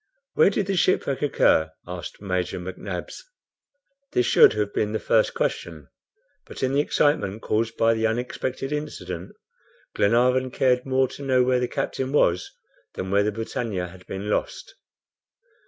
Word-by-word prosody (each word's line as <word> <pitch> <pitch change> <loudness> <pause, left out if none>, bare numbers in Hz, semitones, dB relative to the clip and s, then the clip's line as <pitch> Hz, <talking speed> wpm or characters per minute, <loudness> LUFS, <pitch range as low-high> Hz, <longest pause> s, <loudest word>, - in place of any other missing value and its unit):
"Where 465 - +5
did 200 - -1
the 195 +1 -1
shipwreck 155 -6 +1
occur?" 80 - +2
asked 90 +2 -8
Major 90 -2 -2
McNabbs. 90 +1 -6 0.9
This 125 - +2
should - - +6
have 105 -1 -2
been 105 0 -1
the 110 - 0
first - - +2
question, 80 -5 -3 0.6
but - - -7
in 130 +1 +1
the 140 - +3
excitement 145 -8 +1
caused 115 +1 -1
by 115 0 +4
the 110 0 +1
unexpected 125 +3 -3
incident, 150 0 -5 0.6
Glenarvan 125 +4 +3
cared 125 0 +1
more 130 0 +2
to - - -10
know 130 -2 +3
where 125 0 +2
the 125 - 0
captain 130 +2 -3
was, 90 -11 +2 0.5
than 95 0 -4
where 100 +1 +4
the 105 +1 +1
BRITANNIA 105 -4 -3
had 90 +1 -15
been 95 +2 -5
lost. - - -2
115 Hz, 155 wpm, -24 LUFS, 95-130 Hz, 0.9 s, should